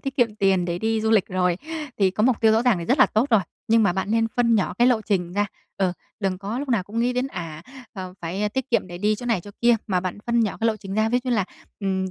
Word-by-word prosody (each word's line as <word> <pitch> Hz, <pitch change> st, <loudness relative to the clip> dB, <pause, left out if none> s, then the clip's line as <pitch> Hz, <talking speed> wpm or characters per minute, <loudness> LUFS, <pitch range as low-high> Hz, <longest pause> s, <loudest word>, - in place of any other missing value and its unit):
tiết 270 Hz, 0 st, -5 dB
kiệm 235 Hz, -5 st, +2 dB
tiền 195 Hz, -3 st, +2 dB
để 175 Hz, 0 st, -2 dB
đi 220 Hz, +2 st, 0 dB
du 220 Hz, 0 st, 0 dB
lịch 215 Hz, -4 st, +4 dB
rồi. 180 Hz, -1 st, +1 dB, 0.4 s
Thì 195 Hz, -2 st, +4 dB
có 205 Hz, +3 st, -2 dB
mục 245 Hz, 0 st, +3 dB
tiêu 220 Hz, -1 st, +5 dB
rõ 225 Hz, +2 st, +3 dB
ràng 245 Hz, -7 st, +3 dB
thì 170 Hz, -, -4 dB
rất 255 Hz, -, +1 dB
là -, -, +7 dB
tốt 230 Hz, +6 st, 0 dB
rồi, 220 Hz, -3 st, +5 dB, 0.3 s
nhưng 225 Hz, 0 st, +5 dB
mà 200 Hz, -, +3 dB
bạn 190 Hz, +2 st, -2 dB
nên 225 Hz, 0 st, +2 dB
phân 235 Hz, -1 st, +3 dB
nhỏ 205 Hz, -4 st, +1 dB
cái 240 Hz, -, +5 dB
lộ 245 Hz, -3 st, +3 dB
trình 180 Hz, -5 st, -1 dB
ra, 205 Hz, +2 st, +1 dB, 0.3 s
ừ, 190 Hz, -2 st, +1 dB, 0.3 s
đừng 190 Hz, -2 st, -1 dB
có 205 Hz, +5 st, -4 dB
lúc 280 Hz, 0 st, -4 dB
nào 230 Hz, -6 st, +2 dB
cũng 205 Hz, +5 st, -6 dB
nghĩ 245 Hz, +1 st, +1 dB
đến 250 Hz, +1 st, 0 dB
à, 165 Hz, -, -7 dB, 0.3 s
à, 185 Hz, -2 st, -5 dB
phải 190 Hz, +5 st, -2 dB
tiết 265 Hz, +4 st, -4 dB
kiệm 235 Hz, -, +2 dB
để 175 Hz, -1 st, -8 dB
đi 210 Hz, +3 st, +2 dB
chỗ 245 Hz, +3 st, -7 dB
này 230 Hz, -6 st, +1 dB
chỗ 205 Hz, -, -11 dB
kia, 240 Hz, 0 st, +5 dB
mà 185 Hz, -3 st, +1 dB
bạn 185 Hz, +2 st, -4 dB
phân 235 Hz, 0 st, +2 dB
nhỏ 215 Hz, -3 st, 0 dB
cái 225 Hz, -, +2 dB
lộ 225 Hz, -1 st, +1 dB
trình 195 Hz, -2 st, -7 dB
ra, 215 Hz, +1 st, +2 dB
ví 245 Hz, +2 st, +2 dB
d -, -, -11 dB
như -, -, 0 dB
là, 205 Hz, -4 st, +1 dB, 0.4 s
ừm, 190 Hz, -1 st, -1 dB
210 Hz, 300 wpm, -23 LUFS, 190-230 Hz, 0.4 s, là